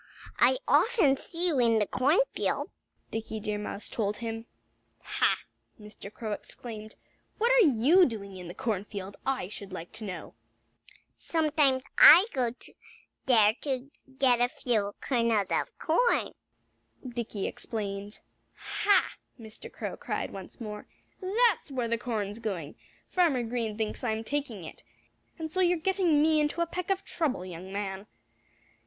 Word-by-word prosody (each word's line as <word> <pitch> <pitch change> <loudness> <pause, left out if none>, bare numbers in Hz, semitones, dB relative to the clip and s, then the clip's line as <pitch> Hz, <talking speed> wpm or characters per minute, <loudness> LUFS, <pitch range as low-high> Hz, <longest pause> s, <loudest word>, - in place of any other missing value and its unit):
"I 260 - +5
often 390 - +4
see 340 +5 -2
you 290 -6 +1
in 230 -2 +4
the 210 - +2
cornfield," 295 - +1 0.4
Dickie 220 0 -4
Deer 210 0 -3
Mouse 210 0 -5
told 210 -2 -2
him. 225 0 -5 0.6
"Ha!" - - +1 0.4
Mr. 210 -1 -11
Crow 220 0 -6
exclaimed. 215 0 -8 0.4
"What 470 +3 +2
are - - +6
you 295 +9 +5
doing 200 -5 -6
in 180 -2 -8
the 175 - -8
cornfield, 200 -2 -4
I 265 -9 0
should 200 -1 -9
like 175 -2 -7
to 225 - -8
know?" 185 -4 -6 0.8
"Sometimes 300 -5 +2 0.2
I 365 - +10
go 250 -3 +1 0.8
there 220 -4 +6
to 270 -1 -3 0.3
get 250 -3 +4
a 245 - +5
few 215 -6 -1
kernels 230 -5 +1
of 165 - -1
corn," 475 +10 +2 0.7
Dickie 235 -4 -4
explained. 205 -2 -5 0.3
"Ha!" 405 -2 +1 0.2
Mr. 220 -1 -11
Crow - - -5
cried - - -3
once 190 -2 -10
more. 210 -3 -7 0.3
"That's 415 0 +2
where 255 -4 -2
the 230 0 -1
corn's 215 -2 -3
going! 180 -10 -4 0.4
Farmer 320 -9 +2
Green 225 -2 -3
thinks 220 +2 -3
I'm 220 -2 -1
taking 250 -7 -3
it. 160 - -10 0.6
And 315 -1 -5
so 370 - -2
you're 355 -1 +3
getting 345 -3 +2
me 315 0 +4
into 300 +3 0
a - - +3
peck 355 +2 -5
of 390 0 0
trouble, 275 - -1
young 185 +1 -8
man." 195 0 -4
235 Hz, 145 wpm, -29 LUFS, 210-305 Hz, 0.8 s, I